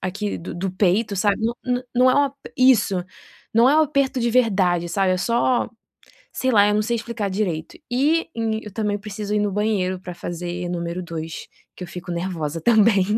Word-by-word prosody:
aqui 200 Hz, +2 st, -3 dB
do 170 Hz, -, -7 dB
do 185 Hz, +2 st, -2 dB
peito 200 Hz, +3 st, +1 dB
sabe, 200 Hz, +1 st, +2 dB
não 235 Hz, +1 st, 0 dB
não 250 Hz, 0 st, -1 dB
não 255 Hz, +1 st, +5 dB
é 285 Hz, +2 st, +4 dB
um -, -, -13 dB, 0.3 s
isso, 220 Hz, -8 st, +4 dB, 0.5 s
não 235 Hz, +3 st, +6 dB
é 300 Hz, -, +4 dB
um -, -, +6 dB
aperto 275 Hz, -3 st, 0 dB
de 235 Hz, -, +1 dB
verdade, 190 Hz, -8 st, +2 dB
sabe 185 Hz, +2 st, +1 dB
eu 185 Hz, -, 0 dB
só 235 Hz, +4 st, +1 dB, 0.6 s
sei 260 Hz, -, 0 dB
lá 205 Hz, -2 st, +6 dB
eu 210 Hz, -, +2 dB
não 210 Hz, -, +2 dB
sei 235 Hz, +2 st, -1 dB
explicar 225 Hz, -3 st, -3 dB
direito 185 Hz, -5 st, -3 dB
e 300 Hz, +7 st, +2 dB, 0.3 s
eu 210 Hz, -, -9 dB
também 210 Hz, -1 st, -1 dB
preciso 210 Hz, 0 st, -5 dB
ir 210 Hz, -, +2 dB
no 205 Hz, -2 st, 0 dB
banheiro 195 Hz, -3 st, 0 dB
para 180 Hz, -1 st, -8 dB
fazer 175 Hz, +1 st, -5 dB
número 175 Hz, +1 st, -3 dB
2, 165 Hz, -2 st, -6 dB, 0.3 s
que -, -, -9 dB
eu -, -, -10 dB
fico 180 Hz, +1 st, -8 dB
nervosa 170 Hz, -3 st, -3 dB
também. 215 Hz, -1 st, +4 dB
205 Hz, 195 wpm, -22 LUFS, 180-235 Hz, 0.6 s, não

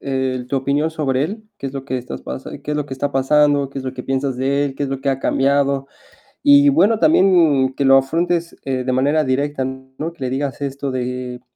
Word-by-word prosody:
eh, 130 Hz, -2 st, -2 dB
tu 140 Hz, -, -1 dB
opinión 140 Hz, +4 st, 0 dB
sobre 140 Hz, -4 st, -1 dB
él, 215 Hz, +7 st, -4 dB
qué -, -, -5 dB
es -, -, -10 dB
lo 135 Hz, -1 st, -6 dB
que 130 Hz, -1 st, -3 dB
estás 125 Hz, 0 st, -7 dB
pasa 130 Hz, -, -7 dB
qué 145 Hz, +1 st, -5 dB
es -, -, -1 dB
lo 150 Hz, -1 st, -2 dB
que 135 Hz, -, -9 dB
está 140 Hz, +2 st, -3 dB
pasando, 145 Hz, +1 st, +3 dB
qué 140 Hz, -, -6 dB
es 130 Hz, -, -7 dB
lo 130 Hz, 0 st, -4 dB
que 125 Hz, -, -6 dB
piensas 135 Hz, -1 st, -2 dB
de 140 Hz, +2 st, +1 dB
él, 135 Hz, -, -4 dB
qué 140 Hz, -, -4 dB
es 140 Hz, -, -1 dB
lo 135 Hz, -1 st, -4 dB
que 140 Hz, 0 st, 0 dB
ha 135 Hz, 0 st, -2 dB
cambiado. 140 Hz, 0 st, +1 dB, 0.6 s
Y 145 Hz, 0 st, +6 dB
bueno, 195 Hz, +10 st, +3 dB
también 165 Hz, -, +4 dB
que -, -, -1 dB
lo 135 Hz, 0 st, +6 dB
afrontes, 165 Hz, +5 st, 0 dB
eh, 130 Hz, -2 st, -2 dB
de 130 Hz, -, 0 dB
manera 145 Hz, +4 st, +2 dB
directa, 135 Hz, +1 st, -1 dB
¿no? 130 Hz, +5 st, -6 dB
Que 140 Hz, -, -8 dB
le 125 Hz, -, -1 dB
digas 140 Hz, +2 st, -3 dB
esto 140 Hz, 0 st, -3 dB
de 125 Hz, -1 st, -4 dB
135 Hz, 240 wpm, -19 LUFS, 130-145 Hz, 0.6 s, Y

